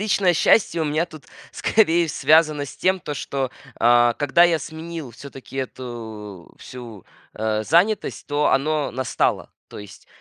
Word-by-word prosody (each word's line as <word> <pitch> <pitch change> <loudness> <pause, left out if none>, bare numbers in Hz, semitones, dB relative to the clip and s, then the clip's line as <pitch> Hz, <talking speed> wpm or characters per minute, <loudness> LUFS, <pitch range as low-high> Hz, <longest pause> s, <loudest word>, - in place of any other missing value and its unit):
личное 200 -3 +2
счастье 170 -1 +3
у 160 - 0
меня 155 +2 0
тут, 155 -4 -13 0.3
скорее, 170 -6 +2
связано 155 -1 +3
с 140 - -11
тем, 185 0 +1
то, 150 - -5
что, 135 -2 -3 0.3
а, 120 0 +4
когда 145 +4 +3
я 170 -2 +3
сменил 160 -3 -7
всё-таки 135 +2 -12
эту 110 -8 -7
всю, 120 -6 -11 0.3
э, 110 0 -1
занятость, 180 - +1
то 145 0 0
оно 150 +2 +1
настало. 130 0 -1 0.2
То - - -10
есть 105 -2 -12
145 Hz, 145 wpm, -22 LUFS, 120-165 Hz, 0.3 s, а